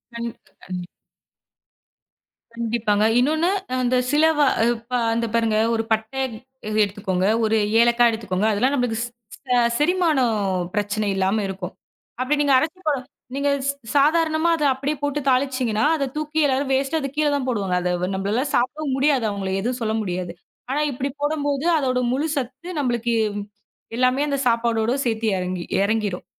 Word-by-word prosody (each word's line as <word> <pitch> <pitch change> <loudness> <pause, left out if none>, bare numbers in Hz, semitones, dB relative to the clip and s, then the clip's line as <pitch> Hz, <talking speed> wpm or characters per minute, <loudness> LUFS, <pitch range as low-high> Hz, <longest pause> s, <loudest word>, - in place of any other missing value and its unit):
கண்டிப்பா 235 0 -7
கண்டிப் 180 -1 -5 1.7
கண்டிப்பாங்க. 225 -3 0 0.2
இன்னொன்னு, 315 +7 +2 0.2
அ - - -1
அந்த 250 +1 +1 0.2
சில 295 +1 +3
வா 290 - +5 0.3
இப்ப 235 +2 -6 0.2
இந்த 230 0 0
பாருங்க, 225 -2 +2 0.2
1 225 0 0
பட்டைய 220 +5 0 0.6
எடுத்துக்கோங்க, 195 -2 -1 0.2
1 220 0 +2 0.3
ஏலக்கா 240 0 +4
எடுத்துக்கோங்க. 210 -3 -2
அதெல்லாம் 250 +7 +1
நம்மளுக்கு 245 -4 0
ஸ் - - -3 0.4
ஸ 250 - +1 0.2
செரிமானம் 300 -7 +2 0.4
பிரச்சனை 210 0 -1
இல்லாம 195 +3 +1
இருக்கும். 190 -1 -6 0.5
அப்டி 265 +4 +1
நீங்க 285 -2 +3
அரைச்சி 320 +7 -1
போட 290 -3 +2 0.4
நீங்க 285 +1 +1 0.2
ஸ் - - +3 0.2
சாதாரணமா 315 +3 +3
அத 310 - -2
அப்படியே 280 +3 -2
போட்டு 290 0 -1
தாளிச்சீங்கன்னா, 255 -4 +1
அத 280 -3 -1
தூக்கி 305 +1 -2
எல்லாரும் 270 0 0
வேஸ்ட்டா 270 +4 +1
அது 275 - -3
கீழ 305 0 +3
தான் 280 -2 -2
போடுவாங்க. 200 -7 -1
அத 180 - -1
வ 180 - 0
நம்பளால 205 +7 0
சாப்பிடவும் 270 +3 0
முடியாது, 275 -2 +2
அவங்கள 195 -2 -3
எதுவும் 245 +5 -2
சொல்ல 220 -1 0
முடியாது. 180 -3 -3 0.4
ஆனா, 280 +3 0
இப்டி 270 +2 -3
போடம்போது, 290 -1 -1
அதோட 255 -4 0
முழு 280 +5 0
சத்து, 270 +4 -5
நம்பளுக்கு 240 -3 0 0.8
எல்லாமே 255 +2 +2
அந்த 280 -1 0
சாப்பாடோடு 230 0 +1
சேத்தி 225 -1 0
எறங்கி 180 -1 -3 0.2
எறங்கிரும். 205 -3 -1
245 Hz, 150 wpm, -22 LUFS, 215-280 Hz, 1.7 s, வா